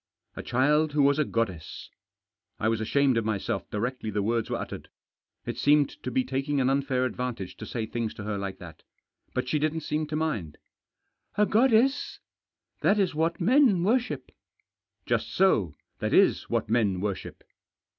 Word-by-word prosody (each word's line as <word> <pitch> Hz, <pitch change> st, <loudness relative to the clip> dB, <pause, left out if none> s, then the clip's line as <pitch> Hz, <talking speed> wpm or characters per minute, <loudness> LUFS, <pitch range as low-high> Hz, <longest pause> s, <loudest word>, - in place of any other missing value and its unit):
" -, -, -50 dB
A -, -, -5 dB
child 150 Hz, +5 st, +2 dB
who 145 Hz, -1 st, +3 dB
was 140 Hz, +2 st, +3 dB
a -, -, +4 dB
goddess." 100 Hz, -, -3 dB, 0.7 s
I 110 Hz, -, +1 dB
was 115 Hz, -1 st, 0 dB
ashamed 135 Hz, +2 st, +2 dB
of 115 Hz, -, +1 dB
myself 105 Hz, -3 st, -2 dB
directly 115 Hz, +2 st, -3 dB
the 105 Hz, -1 st, -1 dB
words 115 Hz, +1 st, 0 dB
were -, -, -1 dB
uttered. -, -, -7 dB, 0.6 s
It -, -, -4 dB
seemed 145 Hz, 0 st, +4 dB
to -, -, -4 dB
be 130 Hz, +1 st, +1 dB
taking 135 Hz, +2 st, -1 dB
an 130 Hz, 0 st, +2 dB
unfair 135 Hz, -2 st, +1 dB
advantage 125 Hz, -7 st, -4 dB
to 110 Hz, -, -8 dB
say 115 Hz, -2 st, -3 dB
things 115 Hz, 0 st, -3 dB
to 105 Hz, -, -7 dB
her 105 Hz, 0 st, -3 dB
like 100 Hz, -1 st, -4 dB
that. 85 Hz, -3 st, -12 dB, 0.5 s
But 130 Hz, 0 st, -1 dB
she 150 Hz, +3 st, +1 dB
didn't 155 Hz, +2 st, -1 dB
seem 150 Hz, +1 st, -2 dB
to 155 Hz, -, -4 dB
mind. 110 Hz, -, -2 dB, 0.4 s
" -, -, -38 dB
A 210 Hz, -, +5 dB
goddess? 255 Hz, +5 st, +3 dB, 0.6 s
That 205 Hz, -, +3 dB
is 195 Hz, -5 st, +1 dB
what 160 Hz, +2 st, 0 dB
men 225 Hz, -2 st, +4 dB
worship." 245 Hz, +5 st, 0 dB, 0.4 s
" -, -, -55 dB
Just -, -, -1 dB
so. 110 Hz, -, +3 dB, 0.2 s
That -, -, 0 dB
is -, -, +3 dB
what -, -, 0 dB
men 105 Hz, -4 st, +1 dB
worship." 100 Hz, 0 st, -4 dB
130 Hz, 180 wpm, -27 LUFS, 110-155 Hz, 0.7 s, A